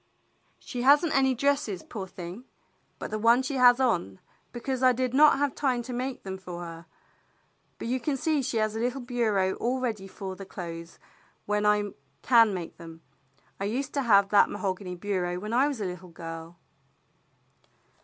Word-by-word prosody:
"She 245 - -6
has 285 +6 +6
n't 320 - -1
any 265 -1 +3
dresses, 275 -8 0
poor 195 -4 -6
thing, 180 +6 -9 0.5
but - - -6
the 215 - -2
one 235 +4 +4
she 270 +1 -2
has 245 0 +6
on, 175 - 0 0.3
because 255 +1 -3
I 255 -1 +6
did 255 0 -1
not 295 +1 +6
have 285 -1 0
time 255 -4 0
to 250 - -6
make 255 +2 -4
them 190 -1 -6
for 175 -2 -7
her, 165 -1 -9 0.9
but - - -6
you 255 +2 0 0.2
see 300 +2 +1
she 250 -2 -2
has 215 0 0
a - - -2
little 250 +3 -1
bureau 220 -6 +1
all 250 +3 -1
ready 220 -6 -3
for 190 0 -7
the 195 - -9
clothes 170 -3 -8 0.5
when 210 0 +1
I 210 -1 +2 0.3
can 230 -4 +6
make 180 -3 -6
them. 165 -1 -12 0.6
I 195 - -2
used 250 +7 -2
to 280 - 0
have 200 -5 +4
that 205 - +5
mahogany 190 -2 -3
bureau 180 -2 -2
when 210 +5 -5
I 260 +4 +4
was 280 -5 -3
a 205 - -2
little 180 0 -6
girl." 165 0 -8
215 Hz, 185 wpm, -27 LUFS, 185-255 Hz, 0.9 s, has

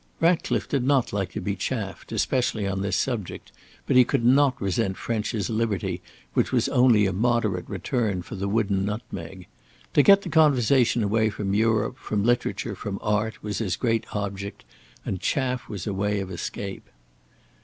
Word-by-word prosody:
Ratcliffe 165 +1 +1
did 140 -3 0
not 130 -4 +2
like 100 -3 -1
to - - -3
be 100 -1 -2
chaffed, 100 -2 -4
especially 120 -5 0
on 95 0 -2
this 100 -1 0
subject, 115 -8 -3 0.3
but - - +1
he 125 - +8
could 115 -1 0
not 135 +1 +4
resent 95 0 -1
French's 110 -2 -2
liberty 110 -3 -1 0.3
which - - +1
was - - +2
only 120 -5 +5
a 95 - 0
moderate 110 -3 0
return 100 -1 -1
for - - -10
the 100 0 -3
wooden 100 -2 +1
nutmeg. 100 -3 -6 0.5
To - - +6
get 200 +6 +6
the - - -5
conversation 130 -6 +4
away 110 +2 +2
from 100 -2 -3
Europe, 110 +3 +1
from 105 -2 -2
literature, 120 +2 0
from 100 -1 -5
art, 105 +1 -1
was 105 -1 -3
his 95 -6 -1
great 115 -2 0
object, 100 -1 -4 0.4
and 95 - -3
chaff 130 -3 -1
was 100 -5 -5
a 105 - -2
way 105 +1 0
of 95 -1 -5
escape. 95 +2 -6
105 Hz, 170 wpm, -25 LUFS, 100-120 Hz, 0.5 s, he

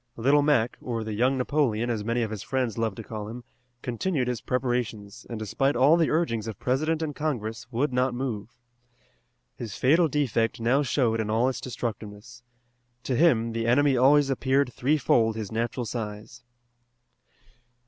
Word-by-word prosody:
Little 140 +5 +4
Mac, 140 -5 +2
or 115 -3 -3
the 110 0 -4
Young 125 +5 +2
Napoleon, 125 -4 0
as 110 -3 -2
many 115 +2 0
of 110 - -3
his 105 -3 -5
friends 130 -4 -2
loved 115 -3 -2
to 115 - -6
call 105 -1 -6
him, 120 +3 -8 0.4
continued 130 +2 -1
his 125 -3 -2
preparations, 120 -3 -3
and 115 - -4
despite 130 +6 0
all 135 +6 +5
the 165 -2 +2
urgings 115 -10 0
of 110 -4 -5
President 155 +5 0
and 150 -2 -4
Congress, 120 -6 -3
would 130 +3 0
not 125 0 +1
move. 120 -5 -4 1.1
His 110 -5 -6
fatal 160 +6 +4
defect 125 -7 0
now 120 +5 +2
showed 125 -5 +1
in 110 -1 -2
all 115 +4 +2
its 130 - -5
destructiveness. 110 -2 -6 0.6
To 130 - -1
him 120 -7 +3
the 115 0 -2
enemy 140 +3 +4
always 135 +2 +4
appeared 135 0 +1
threefold 125 -5 +2
his 110 -3 -5
natural 115 +2 -2
size. 105 -2 -6
120 Hz, 165 wpm, -26 LUFS, 110-135 Hz, 1.1 s, all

